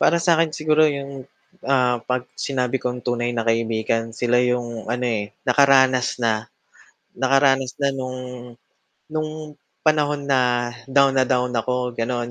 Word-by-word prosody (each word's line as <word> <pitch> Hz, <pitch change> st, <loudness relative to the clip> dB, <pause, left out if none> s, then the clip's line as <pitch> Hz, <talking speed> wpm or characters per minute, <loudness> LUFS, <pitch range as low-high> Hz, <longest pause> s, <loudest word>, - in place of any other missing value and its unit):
Para 170 Hz, -, +4 dB
sa 170 Hz, 0 st, +3 dB
akin 165 Hz, 0 st, +2 dB
siguro 155 Hz, 0 st, +2 dB
'yong 140 Hz, -1 st, -6 dB, 0.8 s
'pag 125 Hz, 0 st, -2 dB
sinabi 130 Hz, -2 st, -2 dB
kong 125 Hz, 0 st, -2 dB
tunay 120 Hz, -1 st, 0 dB
na 115 Hz, -1 st, -3 dB
kaibigan, 115 Hz, 0 st, 0 dB
sila 120 Hz, +2 st, +1 dB
'yong 120 Hz, -3 st, -2 dB
ano 125 Hz, +1 st, -1 dB
eh, 105 Hz, -3 st, -2 dB, 0.2 s
nakaranas 130 Hz, -3 st, +4 dB
na, 110 Hz, -3 st, -1 dB, 0.6 s
nakaranas 135 Hz, -2 st, +2 dB
na 140 Hz, -1 st, 0 dB
no'ng 130 Hz, -1 st, -5 dB, 0.9 s
no'ng 155 Hz, 0 st, -2 dB, 0.5 s
panahon 150 Hz, -2 st, +1 dB
na 125 Hz, -2 st, +2 dB, 0.2 s
down 135 Hz, 0 st, +3 dB
na 130 Hz, -, +3 dB
down 125 Hz, -1 st, +1 dB
ako 125 Hz, +2 st, -1 dB
ganoon 120 Hz, +1 st, -2 dB
125 Hz, 135 wpm, -22 LUFS, 120-140 Hz, 0.9 s, Para